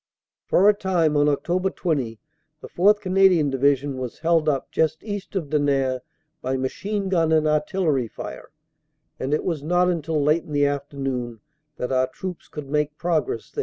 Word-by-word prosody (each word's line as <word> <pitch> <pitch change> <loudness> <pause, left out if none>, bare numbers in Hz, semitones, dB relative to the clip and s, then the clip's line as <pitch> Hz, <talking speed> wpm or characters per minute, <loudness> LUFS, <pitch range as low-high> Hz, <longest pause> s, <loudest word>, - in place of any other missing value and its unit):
"For 195 - +4
a 210 - +7
time 180 -6 +1
on 145 0 +4
Oct. 180 +6 0
20 130 - -1 0.4
the - - -10
4th. 205 +4 +3
Canadian 185 -6 +4
Division 135 0 +1
was 125 -2 -5
held 165 -1 +2
up 140 -3 -2
just 160 0 0
east 205 -2 -6
of 160 -7 -3
Denain 135 -3 +1 0.4
by 130 +1 -1
machine 195 +10 -2
gun 165 -4 +2
and 155 -1 +3
artillery 150 -3 +1
fire, - - -8 0.7
and 130 - -3
it 150 - +1
was 165 -5 -2
not 180 +4 +2
until 160 -2 -1
late 150 +3 +3
in 150 - -9
the 145 0 +3
afternoon 135 -4 -3 0.4
that 125 - -3
our 130 0 +2
troops 180 +6 -7
could 150 -2 -8
make 150 +1 -1
progress 175 - -1
there. - - -7
150 Hz, 170 wpm, -23 LUFS, 140-180 Hz, 0.7 s, a